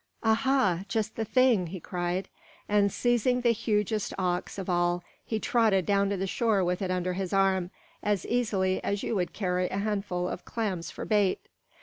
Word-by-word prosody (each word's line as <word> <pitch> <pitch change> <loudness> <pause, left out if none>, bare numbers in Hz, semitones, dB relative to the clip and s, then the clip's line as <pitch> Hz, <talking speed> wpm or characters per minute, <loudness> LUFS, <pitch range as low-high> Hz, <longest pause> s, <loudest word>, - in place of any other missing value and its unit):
"Aha! 225 -5 +3
just 220 -1 -2
the 225 - -1
thing!" 235 -5 +3
he 185 +3 -6
cried; 180 +2 -2 0.4
and 205 -1 +3
seizing 245 +2 +1
the 240 -1 +4
hugest 215 -2 -1
ox 180 0 -1
of 195 - -5
all, 175 -1 +1 0.2
he 220 - -2
trotted 215 -6 +2
down 200 -1 +2
to 200 - -1
the 190 - -1
shore 210 0 +1
with 180 +1 -1
it 190 - -1
under 180 0 -1
his 185 -1 -3
arm, 190 -2 +2 0.3
as 205 -2 0
easily 200 -6 0
as 200 0 -1
you - - -1
would 180 -3 -1
carry 180 -2 -1
a - - -3
handful 200 -3 -1
of 180 - -5
clams 195 -7 -3
for - - -7
bait. 205 -3 +2
195 Hz, 185 wpm, -28 LUFS, 180-220 Hz, 0.4 s, the